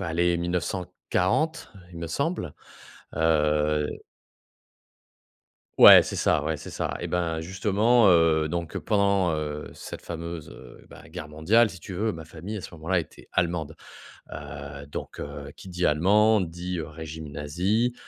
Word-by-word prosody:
allez, 85 +1 +1
1940, 90 - -1 0.2
il 85 - -10
me 85 - -4
semble, 140 - -2 0.6
heu. 75 -1 +2 1.9
Ouais, - - +11
c'est - - -5
ça. 75 - +2
Ouais, 80 +1 -1
c'est - - -9
ça. - - -3
Eh - - -3
ben, 85 -2 -1
justement, 105 +6 +3
heu, 80 -2 +4
donc 85 0 -4
pendant, 100 -3 +2
heu, 75 -1 -4
cette - - -9
fameuse, 85 -1 -6
heu, - - -13
bah, - - -13
guerre 75 - -8
mondiale, 100 +10 +3
si 90 - -10
tu 95 +2 -9
veux, 110 +5 0
ma 80 -2 -8
famille, 85 +6 -7
à - - -4
ce 90 - -10
moment-là, 85 +3 0
était 80 -3 -8
allemande. 85 -3 -1 0.6
Heu, 70 0 -8
donc, 70 - -7
heu, 70 0 -7
qui - - -11
dit 90 0 -3
allemand, 105 +8 +4
dit, 90 +1 -4
heu, 80 - -4
régime 80 0 -8
nazi. 95 +12 0
85 Hz, 150 wpm, -26 LUFS, 75-95 Hz, 1.9 s, Ouais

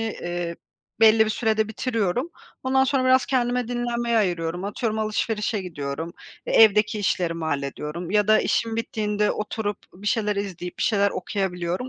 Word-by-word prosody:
eee, 175 -6 -3 0.4
belli 220 0 +7
bir 215 - -1
sürede 220 0 +1
bitiriyorum. 230 - -1 0.3
Ondan 265 0 +3
sonra 270 -1 +1
biraz 255 0 +4
kendime 245 -2 0
dinlenmeye 240 -1 0
ayırıyorum. 175 -2 -1
Atıyorum, 215 +2 -2
alışverişe 215 -1 -1
gidiyorum, 160 -1 -5 0.3
eee, - - -2
evdeki 210 0 +4
işlerimi 170 -4 -1
hallediyorum 150 +4 -3
ya 210 0 +2
da 215 - +6
işim 225 -1 0
bittiğinde 210 -2 0
oturup 210 -1 -3 0.2
bir 200 +3 -11
şeyler 210 -2 +1
izleyip 180 -3 -5
bir - - -1
şeyler 200 -2 +2
okuyabiliyorum. 185 +2 -3
210 Hz, 145 wpm, -24 LUFS, 180-230 Hz, 0.4 s, belli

